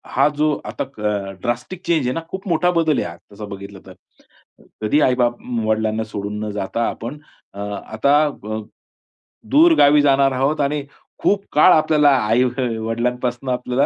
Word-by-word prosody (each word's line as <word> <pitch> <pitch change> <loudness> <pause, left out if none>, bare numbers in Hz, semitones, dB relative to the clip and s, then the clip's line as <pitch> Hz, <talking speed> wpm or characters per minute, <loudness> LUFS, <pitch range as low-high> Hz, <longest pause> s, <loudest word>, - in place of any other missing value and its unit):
हा 135 +2 +5
जो 155 0 +2
आता - - -4 0.2
अ, 100 -2 -2
ड्रास्टिक 120 +10 -3
चेंज 160 -7 +2
आहे 125 - 0
ना, 165 - -3
खूप 190 +1 -7
मोठा 175 +1 +2
बदल 155 -3 +1
आहे - - -2
हा, 85 - -9 0.2
तसा 105 +1 -8
बघितलं 100 -1 -9
तर. 95 - -11 0.9
कधी 110 +8 +2
आई-बाप, 125 -2 +2 0.3
वडिलांना 110 0 0
सोडून 105 -1 -5
न 105 - -4
जाता 105 +3 -2
आपण 120 +6 -6 0.4
अ, 100 - -10
आता 110 +7 0
अ, 110 -7 -5 0.9
दूर 325 +4 +6
गावी 145 +1 +6
जाणार 140 -1 +3
आहोत 135 +4 0
आणि 145 +1 -1 0.4
खूप 200 0 +1
काळ 155 +5 +6
आपल्याला 150 -2 +4 0.2
आई 115 +4 +3 0.4
वडिलांपासून 120 +3 -2
आपल्याला 125 +2 0
125 Hz, 160 wpm, -20 LUFS, 110-150 Hz, 0.9 s, दूर